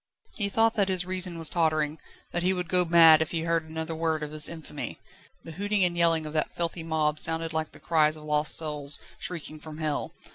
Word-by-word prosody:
He 200 -2 +1
thought 225 +2 +3
that 200 -3 +1
his 185 -1 0
reason 185 -2 0
was 165 -1 -3
tottering, 155 -2 0 0.3
that 175 - -2
he 185 +2 +2
would 180 -2 -3
go 180 +1 +3
mad 165 -2 +7
if 160 - 0
he 165 - -2
heard 165 -1 -1
another 160 +1 -4
word 160 -1 -1
of 150 - -5
this 155 0 0
infamy. 165 -2 -7 0.5
The 165 - -9
hooting 200 +3 0
and 175 -1 +2
yelling 165 -2 +3
of 155 - -6
that 155 -1 -1
filthy 170 0 -2
mob 155 -2 0
sounded 165 0 -1
like 160 0 -2
the - - -15
cries 155 -2 +2
of 155 - -12
lost 150 -1 0
souls, 150 -3 -2 0.2
shrieking 155 -3 -4
from 155 0 -9
hell. 155 -2 -2
160 Hz, 220 wpm, -27 LUFS, 155-175 Hz, 0.5 s, mad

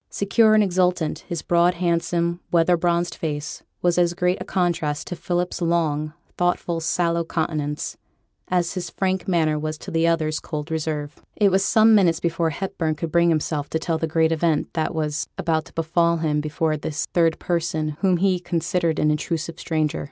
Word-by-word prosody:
Secure 215 +2 +3
and 215 - +5
exultant, 180 -4 +1
his 170 -2 -3
broad, 175 +1 +3
handsome, 170 0 0
weather 175 +1 +4
bronzed 170 0 0
face 150 -1 -4 0.2
was 175 0 +3
as 175 0 +2
great 180 +1 0
a - - -1
contrast 170 -5 -1
to 180 - -5
Philip's 175 +1 -2
long, 155 -3 0 0.3
thoughtful, 175 -1 0
sallow 170 +1 0
countenance, 155 -3 -3 0.5
as 175 -1 0
his 180 -3 -4
frank 190 +2 -1
manner 160 -4 +1
was 155 0 -3
to 190 - -9
the 165 0 +2
other's 155 -2 +1
cold 150 +1 -6
reserve. 150 -2 -3
It 205 -2 +3
was 190 +1 +3
some 220 +2 +5
minutes 175 -6 +4
before 165 -1 0
Hepburn 160 -1 -2
could 160 +1 -4
bring 170 +1 +4
himself 155 -2 -1
to - - 0
tell 160 0 -2
the 160 - -1
great 160 +1 +2
event 160 -1 0
that 160 0 -1
was 150 -1 -2
about 160 -2 0
to - - -17
befall 170 +1 +1
him 150 -2 0
before 155 +1 -1
this 150 +1 -3
third 165 -2 +3
person 160 -3 -1
whom 185 -3 +3
he 185 0 +2
considered 170 -2 -1
as - - +1
an 150 - +3
intrusive 165 +2 -3
stranger. 155 -1 -1
170 Hz, 180 wpm, -23 LUFS, 155-175 Hz, 0.5 s, and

